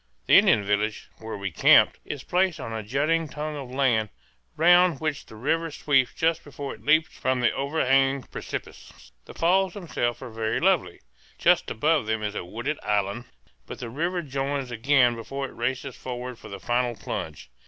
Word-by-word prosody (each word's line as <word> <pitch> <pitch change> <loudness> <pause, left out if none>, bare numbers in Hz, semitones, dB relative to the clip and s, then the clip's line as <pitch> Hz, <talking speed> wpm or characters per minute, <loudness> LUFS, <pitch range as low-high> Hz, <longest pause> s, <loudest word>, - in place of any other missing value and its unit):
The - - +1
Indian 105 - +6
village, 105 +2 -1
where 110 -1 -6
we 100 -2 -4
camped, 80 - +5
is 145 -3 -6
placed 180 -2 +1
on 115 -4 -6
a 110 - -3
jutting 150 +9 0
tongue 150 +1 -5
of 135 -3 -7
land 125 -5 +1 0.5
round 175 -2 +5
which 155 -3 -3
the - - -13
river 165 +8 -1
sweeps 135 -4 +1
just 165 0 +1
before 140 -1 -7
it - - -15
leaps 155 +2 +2
from 130 -1 0
the 120 - +3
over 140 +3 -1
hanging 135 0 +3
precipice. - - -8
The - - -12
falls 185 +2 +2
themselves 120 - -3
are 125 - -8
very 110 0 -1
lovely. - - +1 0.4
Just - - +3
above 150 0 +1
them 110 -1 -1
is 105 -1 -2
a - - -4
wooded 120 +12 -4
island, 105 +3 -1 0.4
but - - -7
the 120 -2 -7
river 170 +6 -2
joins 135 -2 -3
again 125 +1 +3
before 135 +4 -5
it - - -14
races 130 +2 -3
forward 125 -1 -6
for - - -11
the 100 - -7
final 120 +2 0
plunge. 70 - -6
130 Hz, 185 wpm, -25 LUFS, 115-150 Hz, 0.5 s, Indian